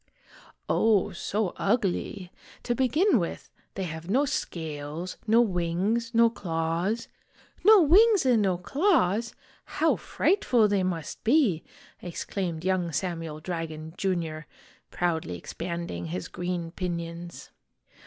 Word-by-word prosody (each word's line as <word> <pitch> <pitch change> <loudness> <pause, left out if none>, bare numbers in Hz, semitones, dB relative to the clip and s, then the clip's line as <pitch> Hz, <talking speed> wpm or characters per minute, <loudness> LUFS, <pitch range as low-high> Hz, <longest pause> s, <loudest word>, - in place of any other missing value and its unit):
"Oh, 210 -3 +3
so 195 +2 -2
ugly. 195 -3 -1 0.3
To 240 - 0
begin 265 - +3
with, 170 - -5 0.2
they 195 - -3
have 160 0 -6
no 265 +8 +3
scales, 160 - -4
no 225 +2 +6
wings, 195 +4 0
no 230 0 +5
claws 175 +1 -2 0.3
" - - -29
"No 420 -1 +8
wings 400 +3 +5
and 245 -4 +4
no 190 -3 +1
claws? 235 - +1 0.4
How - - +3
frightful 250 - +2
they 200 -2 +1
must 170 -5 -3
be!' 230 - +3 0.4
ex 175 -2 -5
claimed 175 -4 -3
young 185 -3 +1
Samuel 165 -3 -3
Dragon, 160 -2 -5
Jr., 165 -5 -2 0.4
proudly 160 - -1
expanding 170 - -5
his 90 +3 -4
green 175 -2 -3
pinions. 170 -1 -5
180 Hz, 120 wpm, -27 LUFS, 165-230 Hz, 0.4 s, No